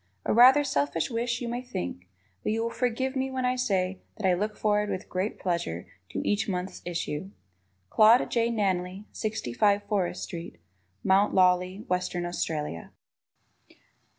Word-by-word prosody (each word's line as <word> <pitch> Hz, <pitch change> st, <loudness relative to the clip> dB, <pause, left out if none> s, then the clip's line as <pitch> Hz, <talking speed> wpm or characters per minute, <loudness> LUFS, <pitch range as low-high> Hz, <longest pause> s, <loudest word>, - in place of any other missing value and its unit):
A -, -, +2 dB
rather 255 Hz, +5 st, +8 dB
selfish 145 Hz, -, 0 dB
wish, 235 Hz, +1 st, -1 dB
you 240 Hz, -, -3 dB
may 240 Hz, +1 st, -3 dB
think, 90 Hz, -, -5 dB, 0.3 s
but -, -, -1 dB
you 225 Hz, +1 st, 0 dB
will 230 Hz, -, -2 dB
forgive 250 Hz, +3 st, -1 dB
me 265 Hz, 0 st, 0 dB
when 260 Hz, -1 st, -2 dB
I 250 Hz, 0 st, +2 dB
say 190 Hz, -6 st, 0 dB, 0.2 s
that 215 Hz, -, -4 dB
I 185 Hz, -, +4 dB
look 210 Hz, +4 st, -2 dB
forward 210 Hz, -1 st, +1 dB
with 185 Hz, -, -4 dB
great 185 Hz, +4 st, -2 dB
pleasure 170 Hz, -, -2 dB, 0.2 s
to -, -, -3 dB
each 205 Hz, 0 st, +1 dB
month's 185 Hz, 0 st, -3 dB
issue. 170 Hz, 0 st, -3 dB, 0.6 s
Claude 220 Hz, +3 st, +6 dB
J. 235 Hz, -1 st, +2 dB
Nanley, 190 Hz, -3 st, -1 dB
65 205 Hz, -, 0 dB
Forrest 190 Hz, -4 st, -1 dB
St., 170 Hz, -3 st, -7 dB, 0.5 s
Mt. 195 Hz, +2 st, +3 dB
Lawley, 185 Hz, +2 st, +3 dB
Western 180 Hz, -1 st, -1 dB
Australia. 150 Hz, -, -3 dB
200 Hz, 150 wpm, -28 LUFS, 180-230 Hz, 0.6 s, rather